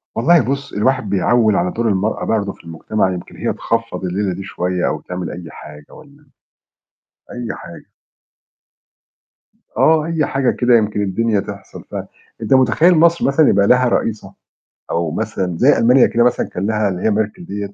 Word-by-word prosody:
والله 165 +8 +4
بُص 140 +2 -4
الواحد 120 0 0
بيعوّل 110 +2 +2
على 90 -2 0
دور 115 0 -2
المرأة 100 +2 -1
برضو 100 -3 -1
في - - -21
المجتمع، 90 +4 -2
يمكن 90 - -9
هي - - -2
تخفّض 115 -3 -3
الليلة 95 +1 -2
دي 95 - -7
شوية 90 -1 -2
أو 75 - -3
تعمل 90 -1 -6
أي 85 -2 -9
حاجة 75 -1 -13
والّا 145 0 -17 1.1
أي 120 -1 -5
حاجة. - - -12 1.9
آه، 160 -1 +3
أي 165 -2 0
حاجة 135 -2 0
كده 120 -1 +3
يمكن 105 -2 -1
الدنيا 105 +2 0
تحصل 100 -1 -9
ف - - -7 0.5
أنت - - 0
متخيل 135 +7 +4
مصر 170 +1 +3
مثلًا 140 +2 +3
يبقى 100 0 +3
لها 125 0 +4
رئيسة؟ 110 -2 -2 0.6
أو 85 -1 -1
مثلًا 95 -2 -3
زي - - +4
ألمانيا 125 +3 +5
كده 120 0 +1
مثلًا 125 0 0
كان 95 +3 -3
ليها 110 -2 0
اللي 90 -1 -5
هي 110 - +2
Merkel 105 - -2
دِيَّة. 100 0 -5
110 Hz, 170 wpm, -18 LUFS, 95-125 Hz, 1.9 s, ألمانيا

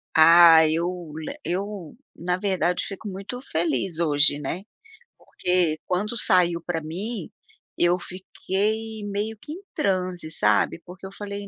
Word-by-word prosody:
Ah, 165 0 +8
eu 170 0 -2
le 160 - -6
eu, 190 -2 -4 0.2
na 180 +1 -1
verdade, 185 -3 0
fico 200 +1 -8
muito 200 +5 -6
feliz 165 - -1
hoje, 145 -2 +4
né. 155 +6 -4 0.5
Porque, 180 -4 0
quando 205 +5 -1
saiu 175 -5 +2
para 170 -2 -2
mim, 185 +5 -5 0.5
eu 175 +1 +3
fiquei 210 +4 -3
meio 210 +2 -3
que 295 - -9
em 365 - -9
transe 185 -4 -1
sabe, 105 +2 +1
porque 185 +2 -11
eu 190 - -8
falei: 200 0 -7
180 Hz, 135 wpm, -24 LUFS, 165-200 Hz, 0.5 s, Ah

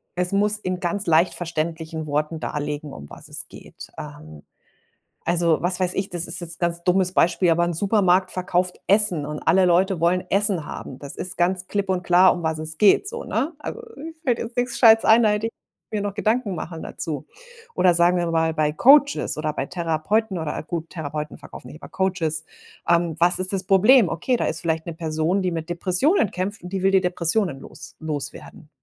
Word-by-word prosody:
es 180 +1 -1
muss 205 +1 +2
in 185 -3 -4
ganz 190 +3 -1
leicht 165 +2 +3
verständlichen 160 -1 -4
Worten 150 +2 -2
darlegen, 150 -1 -4
um 70 -1 -10
was - - -11
es - - -3
geht. - - -12
Ähm, 75 -1 -10 0.8
also, 170 -2 +1
was 180 +1 0
weiß 180 0 0
ich, 195 0 -1
das 175 -1 -4
ist - - -5
jetzt 170 -1 -7
ganz 170 0 -1
dummes 180 0 +2
Beispiel, 175 0 +2
aber 170 +1 +3
'n 175 - -2
Supermarkt 185 0 +2
verkauft 180 0 -1
Essen 195 -7 +5
und 150 0 -5
alle 185 +3 +5
Leute 180 0 +2
wollen 175 +2 +1
Essen 195 -5 +3
haben. 130 - -8
Das 140 -1 -9
ist 185 - -4
ganz 180 +1 0
klipp 200 -2 -2
und 180 -1 0
klar, 180 +2 +5
um 175 - -6
was 160 -1 -1
es 155 0 0
geht 210 - +4
so, 470 0 -7
ne? 305 +5 -1
Also, 470 - -7 0.2
mir 320 +3 -8
fällt 245 -3 0
jetzt 235 +1 -6
nix 245 0 -1
Gescheites 225 -2 +6
ein, 225 +1 +5
da 215 - +4
hätte 210 +2 -1
ich - - -8 0.4
mir 210 -2 -2
noch 200 -1 -3
Gedanken 220 -2 0
machen 165 0 -6
dazu. 150 -5 -5 0.5
Oder 180 -2 +3
sagen 175 +1 +4
wir 175 -1 -1
mal, 160 0 +1
bei 150 -1 +1
Coaches 285 - +4
oder 155 0 -2
bei 135 - -3
Therapeuten 180 +5 -1
oder 160 -2 -4
gut, 165 0 -6
Therapeuten 150 -2 -6
verkaufen 125 - -12
nicht, 155 - -13
aber - - -11
Coaches. 165 -5 -1 0.4
Ähm, 170 -2 +2
was 175 +2 +3
ist 185 +1 -2
das 190 -1 -1
Problem? 205 +4 +5
Okay, 205 +11 -1
da - - -1
ist 165 - -3
vielleicht 160 -1 -2
'ne 170 - -5
Person, 160 +3 -1
die 185 - 0
mit 165 0 -4
Depressionen 185 - +1
kämpft 190 +3 -4
und 180 - -7
die 190 -1 -2
will 195 - +3
die 190 -1 +4
Depressionen 180 -3 0
los - - -11
loswerden, 155 0 -6
175 Hz, 205 wpm, -22 LUFS, 160-195 Hz, 0.8 s, Gescheites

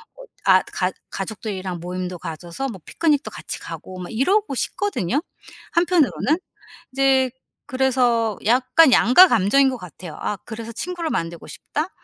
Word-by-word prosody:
어 - - -12 0.2
아 185 -1 +6
가 185 0 0 0.2
가족들이랑 195 -3 -5
모임도 180 0 -5
가져서 170 +11 -5
뭐 195 -6 -8
피크닉도 300 -4 0
같이 - - -6
가고 185 0 -8
막 180 - -7
이러고 365 - +1
싶거든요, 290 - -1 0.5
한편으로는? 335 -3 +2 0.6
이제 265 -1 +3 0.4
그래서 250 -5 +1
약간 255 +5 +5
양가감정인 265 - +6
것 255 - -4
같아요. 180 -3 -10
'아 205 - -2
그래서 230 0 -7
친구를 345 +4 -4
만들고 165 0 -3
싶다.' 310 +5 -4
240 Hz, 320 characters per minute, -22 LUFS, 185-285 Hz, 0.6 s, 아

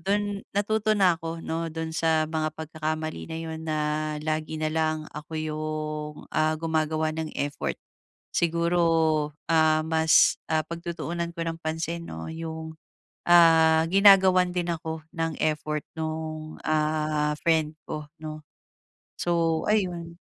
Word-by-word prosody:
dun 205 +2 -1 0.2
natuto 215 +1 +2
na 185 -4 +5
ako 165 0 -4
'no 165 +1 -2
dun 160 0 -4
sa 160 -1 +2
mga 155 0 -1
pagkakamali 155 0 -4
na 160 - -5
yun 160 -1 -5
na 155 -1 -2 0.5
lagi 155 0 -2
na 155 0 -1
lang 155 -1 0
ako 150 +2 -9
yung, 155 -1 -3 0.2
ah, 155 0 +2
gumagawa 155 -1 0
ng 160 0 -4
effort. 145 0 -2 0.6
Siguro, 170 +1 +1 0.7
ah, 155 -1 +4
mas, 160 0 +4
ah, 155 -1 +1
pagtutuunan 170 +1 -4
ko 165 - -2
ng 165 0 -4
pansin, 165 +1 -3
'no, 80 0 -6
yung, 160 -1 -6 0.5
ah, 165 -2 +6
ginagawan 190 -2 +6
din 175 -1 -1
ako 160 -1 -3
ng 165 -1 -1
effort 150 -1 0 0.2
nung, 155 0 -4
ah, 155 -1 +1
friend 160 -2 +2 0.2
ko, 150 0 -4 0.2
'no? 155 -1 -6 0.8
So, 165 -2 +1
ayun. 175 -5 -1
160 Hz, 130 wpm, -26 LUFS, 155-170 Hz, 0.8 s, ah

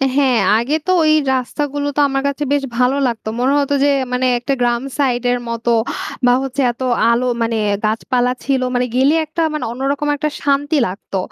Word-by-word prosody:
হ্যাঁ। 270 -4 +3 0.2
আগে 260 +6 -1
তো - - +3
ওই 310 - +4 0.2
রাস্তাগুলো 285 +3 -2
তো - - +2
আমার 270 0 -1
কাছে 280 +1 -2
বেশ 285 - +1
ভালো 250 +2 +2
লাগতো। 230 -2 -4
মনে 265 +3 +2
হতো 285 0 0
যে 285 - +4 0.2
মানে 250 +1 0
একটা 275 +3 -2
গ্রাম 240 -1 +1 0.2
সাইডের 245 -3 +1
মতো 230 +1 -1 0.5
বা 245 - +5
হচ্ছে 270 +1 -2
এত 240 - -15 0.3
আলো 240 +2 +1 0.2
মানে 230 0 0 0.3
গাছপালা 245 +3 0
ছিল 270 -2 0
মানে 245 0 +1
গেলে 270 +4 +4
একটা 315 +2 -4
মানে 305 - -3
অন্যরকম 275 +4 -2
একটা 305 +1 -2
শান্তি 285 +2 +1
লাগতো। 195 +1 -6
260 Hz, 180 wpm, -17 LUFS, 245-285 Hz, 0.5 s, বা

